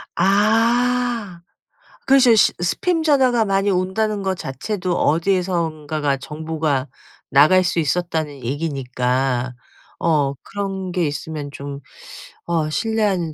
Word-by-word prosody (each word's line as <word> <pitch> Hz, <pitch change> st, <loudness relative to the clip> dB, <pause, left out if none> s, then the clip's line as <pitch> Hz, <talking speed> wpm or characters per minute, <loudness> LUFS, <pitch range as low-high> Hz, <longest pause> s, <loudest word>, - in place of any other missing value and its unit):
아 225 Hz, 0 st, +1 dB, 0.6 s
그렇죠. 265 Hz, -4 st, +6 dB
스 210 Hz, -, +5 dB
스팸 325 Hz, -, -1 dB
전화가 260 Hz, -7 st, +3 dB
많이 195 Hz, 0 st, +1 dB
온다는 200 Hz, +3 st, 0 dB
것 190 Hz, -1 st, -1 dB
자체도 180 Hz, +6 st, -3 dB
어디에선가가 160 Hz, -4 st, 0 dB
정보가 150 Hz, -1 st, -3 dB, 0.4 s
나갈 155 Hz, +7 st, +5 dB
수 175 Hz, -1 st, 0 dB
있었다는 155 Hz, -3 st, -2 dB
얘기니까. 130 Hz, -2 st, -1 dB, 0.4 s
어 145 Hz, -4 st, +1 dB
그런 195 Hz, -2 st, -4 dB
게 175 Hz, -1 st, 0 dB
있으면 145 Hz, 0 st, -5 dB
좀 140 Hz, 0 st, -7 dB, 0.7 s
어 160 Hz, -3 st, 0 dB
신뢰하는 200 Hz, -5 st, 0 dB
175 Hz, 235 characters per minute, -20 LUFS, 150-205 Hz, 0.7 s, 그렇죠